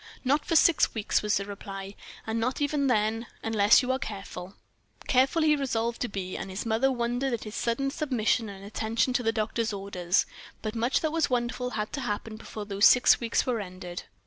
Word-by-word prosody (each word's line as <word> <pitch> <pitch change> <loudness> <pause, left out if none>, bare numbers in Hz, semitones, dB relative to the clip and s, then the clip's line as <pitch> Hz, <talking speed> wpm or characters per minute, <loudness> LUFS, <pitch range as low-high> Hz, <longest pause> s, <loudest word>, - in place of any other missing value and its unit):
"Not 285 +3 +2
for 330 - +1
six 320 -4 +4
weeks," 215 -2 +1
was 210 -1 +1
the 200 - -3
reply, 195 -1 -7 0.3
"and 225 +1 -2
not 250 +3 -1
even 285 -1 +1
then 225 -1 +1 0.2
unless 220 +2 +5
you 250 - 0
are 260 - 0
careful." 195 -3 -7 0.5
Careful 265 +6 +3
he 305 -1 +5
resolved 235 -4 -2
to 245 - 0
be, 190 -3 -5
and - - -5
his 190 +4 -5
mother 230 +4 +2
wondered 245 +1 -1
at 235 - -3
his 215 - -8
sudden 240 +4 -1
submission 245 -6 0
and 195 0 -10
attention 225 +4 0
to 250 - +1
the 225 -1 +1
doctor's 225 +1 -1
orders; 195 -2 0 0.4
but 215 -1 -3
much 235 +3 +1
that 315 - 0
was 325 -2 +1
wonderful 250 0 -1
had 215 -3 -4
to 280 - -3
happen 215 -1 -3
before 215 -1 -8
those 200 0 +5
six 245 - +6
weeks 235 -1 0
were 245 -3 0
ended. 180 -2 -7
225 Hz, 200 wpm, -28 LUFS, 205-255 Hz, 0.5 s, six